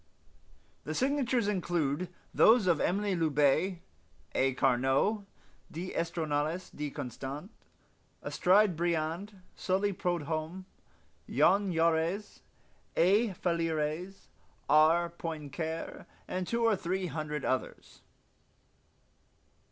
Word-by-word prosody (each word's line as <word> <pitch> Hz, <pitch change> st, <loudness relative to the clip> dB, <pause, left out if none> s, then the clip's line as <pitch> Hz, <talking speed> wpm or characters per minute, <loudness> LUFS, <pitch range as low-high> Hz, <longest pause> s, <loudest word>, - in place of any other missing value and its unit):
The 155 Hz, -, -4 dB
signatures 255 Hz, -, +1 dB
include 175 Hz, -4 st, -1 dB, 0.2 s
those 225 Hz, -2 st, +6 dB
of 170 Hz, -4 st, +2 dB
Emile 200 Hz, +1 st, +1 dB
Loubet, 160 Hz, +4 st, +2 dB, 0.5 s
A. 135 Hz, 0 st, +2 dB
Carnot, 135 Hz, -, +2 dB, 0.4 s
d'Estournelles 165 Hz, -1 st, -2 dB
de 150 Hz, 0 st, -4 dB
Constant, 140 Hz, -, -6 dB, 0.7 s
Aristide 190 Hz, 0 st, +3 dB
Briand, 170 Hz, +4 st, -2 dB, 0.2 s
Sully 195 Hz, +2 st, 0 dB
Prudhomme, 170 Hz, 0 st, -3 dB, 0.6 s
Jean 200 Hz, -1 st, +3 dB
Jaurés, 165 Hz, +4 st, 0 dB, 0.6 s
A. 200 Hz, +5 st, +4 dB
Fallieres, 165 Hz, +1 st, -2 dB, 0.4 s
R. 160 Hz, +3 st, +5 dB
Poincare, 160 Hz, -1 st, -5 dB, 0.2 s
and 185 Hz, -1 st, -3 dB
two 235 Hz, 0 st, 0 dB
or 225 Hz, -2 st, +4 dB
three 185 Hz, +1 st, -2 dB
hundred 150 Hz, -2 st, -4 dB
others. 130 Hz, -, -3 dB
170 Hz, 85 wpm, -31 LUFS, 155-190 Hz, 0.7 s, those